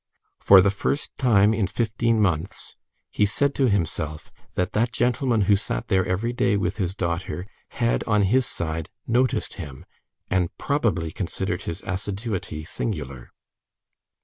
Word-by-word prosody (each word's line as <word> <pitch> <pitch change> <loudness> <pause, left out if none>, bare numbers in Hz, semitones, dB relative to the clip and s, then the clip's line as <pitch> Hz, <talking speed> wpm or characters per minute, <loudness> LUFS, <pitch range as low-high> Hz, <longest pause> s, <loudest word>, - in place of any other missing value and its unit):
For 95 -1 +8
the 100 +1 +3
first 125 +8 -2
time 110 -5 +4
in 105 -4 +1
fifteen 115 +1 0
months, 95 -1 -1 0.4
he 105 - +2
said 140 +7 +1
to 135 -3 +2
himself 80 -5 -2 0.2
that 90 +3 -1
that 115 +3 +1
gentleman 120 -1 +1
who 100 +1 +4
sat 100 - -3
there 95 -2 +3
every 105 +7 -1
day 105 -4 +2
with 100 - -1
his 95 -3 -2
daughter, 90 0 -3 0.2
had, 115 -1 0
on 105 -2 +3
his 125 +6 +3
side, 80 +2 -4 0.2
noticed 125 +2 +1
him, 70 -5 -9 0.4
and 90 -3 +1
probably 100 - 0
considered 95 +1 -3
his 85 +3 -6
assiduity 95 -4 -4
singular. 75 - -5
100 Hz, 145 wpm, -24 LUFS, 85-115 Hz, 0.4 s, For